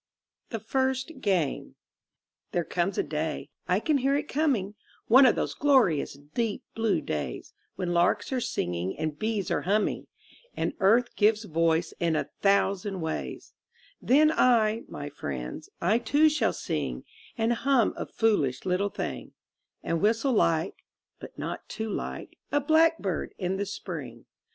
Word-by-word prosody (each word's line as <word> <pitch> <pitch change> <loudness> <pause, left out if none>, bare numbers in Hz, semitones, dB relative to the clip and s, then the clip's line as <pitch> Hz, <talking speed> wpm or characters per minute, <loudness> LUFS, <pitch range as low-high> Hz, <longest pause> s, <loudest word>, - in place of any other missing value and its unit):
THE 225 - -3
FIRST 260 +6 -1
GAME 180 -9 0 0.8
There 175 - +1
comes 180 +3 -1
a - - +2
Day 150 -1 -3 0.2
(I 180 +2 +2
can 290 +5 +1
hear 270 +2 +2
it 295 +1 -1
coming), 260 -10 0 0.3
One 260 +3 +7
of 240 - +4
those - - -1
glorious 250 - +3 0.2
deep 230 -3 -1
blue 220 -7 +1
days, 75 - -4 0.2
When 175 -1 -2
larks 175 +6 +2
are 255 - 0
singing 90 - -2
and 155 -1 -3
bees 215 -3 -1
are - - +1
humming, 205 +3 0 0.5
And - - -1
Earth 230 +5 +3
gives 215 +1 +3
voice 165 -2 +1
in 165 -2 +1
a - - -2
thousand 195 -1 +1
ways 160 0 -5 0.5
Then 305 +4 +5
I, 230 -5 +3
my 145 - -6
friends, 65 - -6
I 210 +7 +2
too 290 +6 +4
shall 300 0 +1
sing, - - -3 0.3
And 230 +1 +2
hum 255 -1 +2
a - - -5
foolish 150 - +1
little 185 +2 +1
thing, - - -5 0.5
And 165 - -1
whistle 225 +6 +2
like 165 -6 +1 0.4
(but - - -11
not - - -5
too 220 -1 -4
like) - - -5
a 290 - +3
blackbird 315 - +2
in 185 +1 -2
the 200 0 -2
Spring. 205 - -7
205 Hz, 150 wpm, -27 LUFS, 170-245 Hz, 0.8 s, One